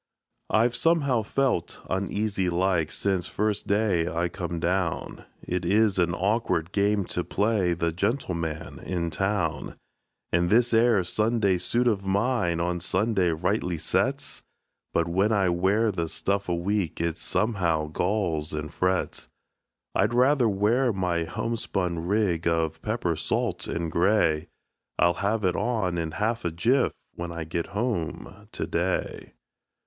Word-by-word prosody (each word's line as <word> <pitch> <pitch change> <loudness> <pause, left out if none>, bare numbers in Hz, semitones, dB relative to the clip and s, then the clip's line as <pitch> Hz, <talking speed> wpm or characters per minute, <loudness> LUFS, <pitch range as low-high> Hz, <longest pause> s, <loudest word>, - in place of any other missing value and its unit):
I've 115 +2 +3
somehow 140 -6 +2
felt 125 -4 -1
uneasy 100 0 -1
like, 85 -2 +1
since 95 -3 -1
first 105 0 -1
day 100 -5 +2
I 85 +1 0
come 85 -2 -4
down; 90 0 -2 0.2
It 90 0 -2
is 100 +2 +3
an 85 -1 +2
awkward 95 -4 0
game 100 -1 +1
to 90 - -3
play 100 -4 +1
the 85 0 -1
gentleman 90 - -2
in 85 -2 -3
town; 85 -3 -1 0.6
And 85 0 +2
this 120 +3 +4
'ere 115 -3 +4
Sunday 105 0 +1
suit 120 +7 +1
of 105 -4 +1
mine 100 -3 +1
on 90 +1 -1
Sunday 95 +1 +1
rightly 90 +2 -1
sets; 80 - -1 0.5
But 85 0 +1
when 95 +5 +2
I 100 -4 +3
wear 95 +6 +2
the 85 -4 -2
stuff 100 +2 -1
a 85 - +1
week, 90 -1 -1
it 85 -1 0
somehow 85 -8 0
galls 80 -2 -1
and 75 0 -4
frets. 95 0 -1 0.7
I'd 120 - +1
rather 125 -1 +4
wear 110 +6 +2
my 90 -4 -1
homespun 90 -4 -2
rig 95 -5 +1
of 80 -1 0
pepper 105 -6 -1
salt - - -1
and 85 -1 -3
gray 85 -4 +2 0.5
I'll 85 0 +4
have 105 +2 0
it 90 -1 +2
on 100 -8 0
in 80 -2 -3
half 115 +5 -1
a 85 - 0
jiff, 115 +11 +2 0.2
when 85 0 -5
I 85 -1 -4
get 85 +1 -3
home 100 -5 -3
to - - -3
day. - - -2
95 Hz, 145 wpm, -26 LUFS, 85-110 Hz, 0.7 s, this